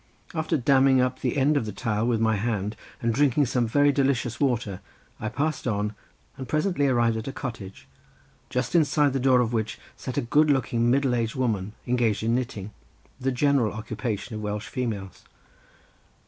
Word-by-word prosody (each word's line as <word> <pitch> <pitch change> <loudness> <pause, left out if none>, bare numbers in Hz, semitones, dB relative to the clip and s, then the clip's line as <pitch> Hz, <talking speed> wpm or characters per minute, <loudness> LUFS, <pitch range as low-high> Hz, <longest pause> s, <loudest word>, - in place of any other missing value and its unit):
After 160 0 0
damming 135 0 +4
up 125 0 +1
the 125 +1 -1
end 145 +3 +3
of 115 - -1
the - - -3
tile 110 +2 -1
with 120 -2 +1
my 110 -1 +2
hand 105 -1 -2 0.3
and 115 0 +2
drinking 145 +2 +3
some 120 -1 0
delicious 135 -2 +2
water 120 -8 0 0.4
I 110 - -3
passed 145 +2 -2
on 105 -1 -1 0.4
and 130 - -6
presently 155 -2 +1
arrived 120 -3 +2
at 110 - -5
a - - -2
cottage 110 -8 -7 0.6
just 125 0 -2
inside 150 -4 +3
the 135 - 0
door 130 -1 +4
of 120 -1 -1
which 110 -2 -1 0.2
sat 130 - -6
a - - +3
good 150 +6 +3
looking 120 -3 +2
middle 135 0 +2
aged 115 -2 -1
woman 110 -6 -1
engaged 120 -4 +1
in 115 +1 +1
knitting, 110 -5 -3 0.5
the 135 0 0
general 130 -4 +2
occupation 110 +1 -4
of 110 - -5
Welsh 105 0 -4
females. 110 -7 -4
120 Hz, 175 wpm, -26 LUFS, 110-135 Hz, 0.6 s, damming